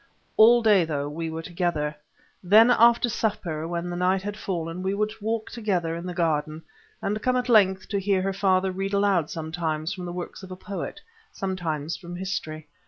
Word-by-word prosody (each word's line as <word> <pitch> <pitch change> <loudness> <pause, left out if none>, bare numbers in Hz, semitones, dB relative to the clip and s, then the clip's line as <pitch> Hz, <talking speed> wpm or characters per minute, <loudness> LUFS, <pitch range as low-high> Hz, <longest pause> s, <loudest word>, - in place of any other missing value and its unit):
All 235 +2 +7
day 205 -5 +5
through 145 -3 -2
we 165 +2 -4
were 160 +1 -5
together. 170 -4 -2 0.5
Then 215 +6 +6
after 235 +1 +5
supper, 200 -9 -2
when 170 +1 -3
the - - -4
night 185 +2 +1
had 205 0 -4
fallen, 175 -4 -4
we 190 +1 -1
would 210 +1 0
walk 220 +1 -2
together 185 -8 -1
in 170 +2 -6
the 180 - -4
garden 155 -2 -1 0.4
and 210 +2 -1
come 255 0 +1
at 250 0 -1
length 190 -4 +4
to 200 - 0
hear 195 -1 +1
her 195 0 -1
father 190 -1 +2
read 195 +2 -3
aloud 195 -6 +2
sometimes 160 -1 -3
from 185 -2 -7
the 175 - -5
works 175 +1 -6
of 190 - -10
a 185 - -6
poet, 200 +2 -6 0.3
sometimes 170 -5 -3
from 175 -1 -9
history. 175 -5 -4
185 Hz, 190 wpm, -25 LUFS, 165-205 Hz, 0.5 s, All